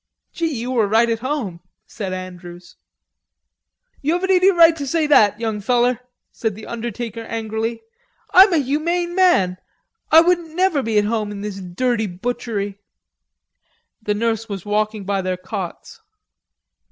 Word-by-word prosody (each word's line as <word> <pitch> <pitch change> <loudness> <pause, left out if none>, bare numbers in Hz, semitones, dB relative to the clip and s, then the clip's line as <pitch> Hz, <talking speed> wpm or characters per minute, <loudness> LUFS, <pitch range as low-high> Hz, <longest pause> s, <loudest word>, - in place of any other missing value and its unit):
"Gee, 335 - -1
you 250 -2 -4
were 230 -5 +2
right 230 +3 +3
at 225 - -1
home!" 245 - -3 0.3
said 195 -3 -6
Andrews. 180 -1 -9 1.3
"You 300 +4 +1
haven't 380 +2 0
any 370 +1 +5
right 335 -3 +6
to 285 -2 -4
say 320 +3 +1
that, 215 -8 +4
young 220 -2 -2
feller," 245 +2 +2 0.3
said 220 -3 -3
the 215 - -10
undertaker 235 0 -5
angrily. 225 0 -4 0.5
"I'm 380 +2 +8
a 335 - +3
humane 335 +5 -1
man. 350 - +3 0.5
I 320 - +9
won't 340 -2 0
never 360 -5 +2
be 225 -3 -1
at 205 - +3
home 215 -1 -1
in 200 -1 -7
this 200 -2 -5
dirty 220 +5 -1
butchery." 205 0 -4 1.2
The 210 -1 -1
nurse 225 +1 -1
was 195 -3 -6
walking 210 0 -1
by 195 0 -1
their 185 -1 -2
cots. 185 - -7
225 Hz, 150 wpm, -20 LUFS, 205-295 Hz, 1.3 s, I